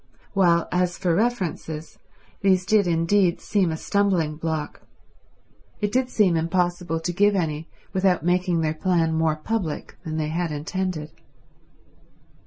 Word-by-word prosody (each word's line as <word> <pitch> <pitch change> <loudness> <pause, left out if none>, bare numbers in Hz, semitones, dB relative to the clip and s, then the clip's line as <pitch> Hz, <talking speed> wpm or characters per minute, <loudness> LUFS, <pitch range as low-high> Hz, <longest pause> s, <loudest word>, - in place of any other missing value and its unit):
While 175 -4 +3
as 180 -1 0
for 175 -2 +1
references, 175 -7 -2 0.4
these 185 -2 +3
did 210 -2 +3
indeed 170 +2 +2
seem 195 -5 +1
a 160 - -3
stumbling 185 -6 +1
block; 160 -1 -4 1.0
it 205 -1 -1
did 255 +1 +1
seem 200 -8 +3
impossible 175 0 0
to 175 +2 -3
give 205 +3 +3
any 160 -3 -2 0.2
without 185 -4 +2
making 180 -1 +2
their 155 -1 0
plan 165 0 +1
more 160 -1 +2
public 165 0 -4
than 160 -2 -4
they 155 -1 -1
had 170 +1 -1
intended. 155 +1 -3
175 Hz, 135 wpm, -24 LUFS, 160-190 Hz, 1.0 s, While